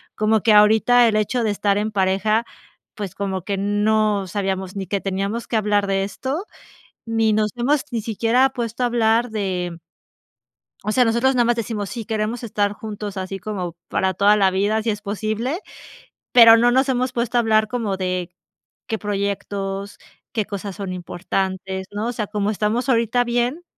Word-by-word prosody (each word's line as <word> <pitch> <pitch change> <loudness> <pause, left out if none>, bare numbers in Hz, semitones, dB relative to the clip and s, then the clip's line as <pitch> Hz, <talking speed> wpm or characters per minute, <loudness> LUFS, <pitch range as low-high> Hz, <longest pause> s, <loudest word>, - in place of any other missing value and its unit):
como 215 0 +2
que 220 - +4
ahorita 220 +3 +6
el 220 - +1
hecho 215 +3 0
de 215 - +1
estar 200 0 +1
en 215 +1 -1
pareja, 205 +3 +1 0.5
pues 200 -4 -6
como 190 -2 -3
que 200 +1 -2
no 205 0 +1
sabíamos 190 -1 -3
ni 195 -1 -3
que 200 +2 -2
teníamos 195 +4 -3
que - - -3
hablar 205 -2 +2
de 195 0 +1
esto, 265 - -4 0.6
ni 225 -1 +2
nos 215 0 +1
hemos 270 +4 +1
ni 230 -3 -2
siquiera 230 +4 +2
puesto 235 -2 -4
a - - +3
hablar 235 0 +2
de 180 -5 -3 1.1
o 215 - -1
sea, 250 +2 +4
nosotros 235 +3 +2
nada 245 -1 +3
más 240 0 +2
decimos: 215 -3 -3
"Sí, 235 -3 -5
queremos 220 +2 -2
estar 205 -3 0
juntos 210 -2 -7
así 190 +1 -4
como 185 -4 -5
para 190 0 0
toda 200 +3 +4
la 195 -2 +4
vida, 205 +4 +1
si 225 - 0
es 210 -1 -4
posible", 220 - -2 0.7
pero 230 -2 +9
no 240 +1 +4
nos 265 +2 +2
hemos 255 0 0
puesto 240 -1 -1
a - - +5
hablar 220 -1 +3
como 215 -4 -2
de, 185 -2 -2 0.6
qué 225 - -2
proyectos, 200 -1 -3 0.4
qué 215 -3 0
cosas 200 -1 -6
son 195 -3 -4
importantes, 190 +1 -3
¿no? 210 +2 -3
O - - -1
sea, 215 -3 -3
como 210 0 -1
estamos 220 +5 -1
ahorita 235 0 +2
bien, 245 +7 -1
215 Hz, 180 wpm, -21 LUFS, 195-230 Hz, 1.1 s, pero